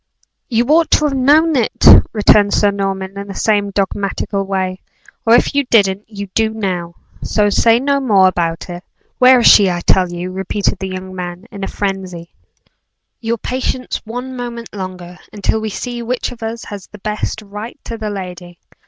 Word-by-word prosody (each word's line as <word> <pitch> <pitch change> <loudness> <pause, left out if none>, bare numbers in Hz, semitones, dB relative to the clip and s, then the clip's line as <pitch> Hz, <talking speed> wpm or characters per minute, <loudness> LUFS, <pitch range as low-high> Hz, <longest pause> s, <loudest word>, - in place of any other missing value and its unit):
"You 235 -1 +1
ought 325 +1 +4
to 305 - +3
have 285 -2 0
known 300 +5 +4
it!" 240 -5 0 0.3
returned 205 -1 +4
Sir 205 -1 +3
Norman, 195 -1 -3
in 200 - -7
the 195 - -8
same 205 -2 +1
dogmatical 195 0 -2
way; 190 -1 -3 0.5
"or 230 - +7
if 245 - +2
you 285 0 +2
didn't, 200 -4 +2
you 200 -2 -6
do 220 -1 +2
now; 180 -5 -3 0.3
so 205 -1 +1
say 230 +3 +4
no 280 +2 +1
more 205 -8 +4
about 170 -3 -2
it. 175 0 -8 0.4
Where 255 0 +7
is - - +1
she, 200 -2 +7
I 175 -1 -2
tell 180 0 +2
you?" 175 +1 -5
repeated 190 +1 -2
the 190 0 -4
young 185 0 -7
man, 180 0 -6
in 200 -1 -7
a - - -2
frenzy. 185 -4 -4 0.9
"Your 230 +1 -2
patience 255 +2 -3
one 245 +3 -6
moment 240 -2 -7
longer, 185 -2 -7
until 215 +1 -1
we 220 - -3
see 240 +3 -5
which 245 +2 -3
of 245 - -12
us 225 +1 -5
has 205 -3 -8
the 210 - -13
best 215 +1 -4
right 210 +5 -8
to 230 - -6
the 220 -1 -4
lady. 180 -3 -7
205 Hz, 185 wpm, -17 LUFS, 190-235 Hz, 0.9 s, or